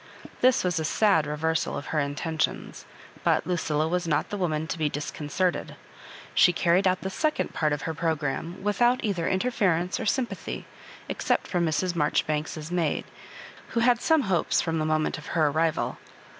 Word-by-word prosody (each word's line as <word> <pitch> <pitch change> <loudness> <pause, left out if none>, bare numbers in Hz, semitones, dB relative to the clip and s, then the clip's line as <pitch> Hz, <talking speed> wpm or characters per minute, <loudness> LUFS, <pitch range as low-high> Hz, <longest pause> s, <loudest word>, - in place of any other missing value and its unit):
This 255 0 +4
was 180 -3 0
a - - -1
sad 160 -2 +3
reversal 155 +2 -1
of - - -6
her 155 - +2
intentions, 150 +2 -2 0.4
but - - +2
Luciila 160 -3 0
was 175 +1 -1
not 155 +6 0
the 205 - -2
woman 160 -4 -1
to 160 - -4
be 155 -1 +1
disconcerted. 150 +5 -2 0.6
She 180 - +6
carried 175 +2 +2
out 185 0 +1
the 190 - -4
second 305 +9 -1
part 155 -2 +1
of 145 -1 -2
her 160 - -2
programme 160 +2 -2
without 240 +5 +2
either 185 -6 -1
interference 190 -4 +1
or - - -3
sympathy, 255 0 -2 0.4
except - - 0
from 175 -2 0
Mrs. 175 +3 0
Marjoribanks's 155 +1 -1
maid, 170 -4 0 0.7
who - - +4
had 240 0 +4
some 320 -2 +4
hopes 190 -8 +1
from 165 -1 0
the 155 - 0
moment 155 0 0
of - - -12
her 155 -2 +4
arrival. 160 +2 0
165 Hz, 170 wpm, -26 LUFS, 155-190 Hz, 0.7 s, She